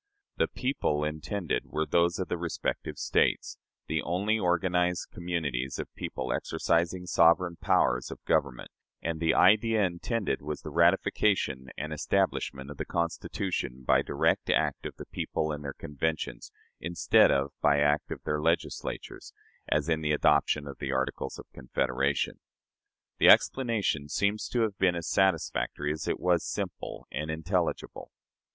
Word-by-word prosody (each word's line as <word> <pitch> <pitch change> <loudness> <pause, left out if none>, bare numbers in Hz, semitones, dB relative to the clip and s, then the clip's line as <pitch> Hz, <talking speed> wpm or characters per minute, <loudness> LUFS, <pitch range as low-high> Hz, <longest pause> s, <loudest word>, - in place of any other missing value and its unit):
The - - +2
"people" 125 - -1
intended 75 0 -2
were 80 0 -1
those 85 +1 +2
of 95 - -3
the - - -1
respective 85 -1 -3
States - - +1 0.3
the 80 -1 -1
only 100 +7 0
organized 90 -1 +1
communities 75 -7 -2
of - - -6
people 65 -1 -4
exercising 85 +2 0
sovereign 85 +1 +4
powers 60 0 +2
of - - -10
government; 65 -3 0 0.3
and 80 -1 -2
the 80 0 +2
idea 110 +2 +5
intended 95 +5 -2
was 75 +1 -5
the - - -7
ratification 65 -11 +2
and 75 +1 -4
"establishment" 70 -2 -1
of 75 - -9
the - - -2
Constitution 85 -5 -3
by - - +4
direct - - 0
act - - +1
of - - -10
the - - -9
people 80 0 -2
in 75 -1 -4
their 70 -1 -5
conventions, 80 +2 -3 0.3
instead 85 0 +4
of 70 +1 +1
by 70 - +4
act 75 +1 +2
of - - -6
their 75 0 -1
Legislatures, 85 +2 -2 0.4
as 75 0 +1
in 80 -1 +1
the 75 -1 +1
adoption 75 0 +3
of 70 - -8
the 70 - -3
Articles 65 0 -2
of - - -10
Confederation. 65 +2 -1 0.8
The - - +7
explanation 105 - +3
seems 100 +5 0
to 120 - 0
have 105 -3 -1
been 90 -2 +3
as 85 -1 -4
satisfactory 80 -5 +1
as 75 0 -4
it - - -1
was 90 -2 +2
simple - - -5
and 75 +1 -4
intelligible. 80 0 -2
80 Hz, 150 wpm, -29 LUFS, 75-90 Hz, 0.8 s, The